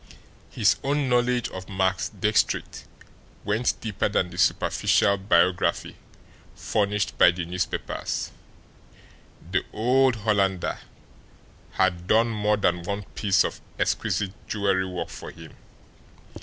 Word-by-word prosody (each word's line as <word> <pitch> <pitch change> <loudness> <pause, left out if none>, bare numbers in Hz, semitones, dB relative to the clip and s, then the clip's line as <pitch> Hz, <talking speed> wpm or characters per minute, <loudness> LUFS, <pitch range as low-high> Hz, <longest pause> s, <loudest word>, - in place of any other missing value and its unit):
His - - +2
own 140 0 0
knowledge 125 -1 +2
of 95 0 -9
Max 95 -1 0
Diestricht 105 0 0 0.6
went 105 +4 0
deeper 105 -2 -1
than 90 -3 0
the - - -10
superficial 100 - +2
biography 90 -2 +1 0.6
furnished 105 -1 -1
by - - +8
the 90 0 -3
newspapers 90 +2 -3 1.2
the - - +1
old 130 +3 +3
Hollander 100 -4 0 0.9
had 90 -2 0
done 115 +3 +4
more 105 -1 +1
than 90 -3 +1
one 100 +4 -4
piece 100 -3 +2
of - - -5 0.2
exquisite 100 -3 -1 0.2
jewelry 100 -3 0
work 90 -1 -5
for - - -9
him. - - -13
100 Hz, 115 wpm, -25 LUFS, 95-110 Hz, 1.2 s, by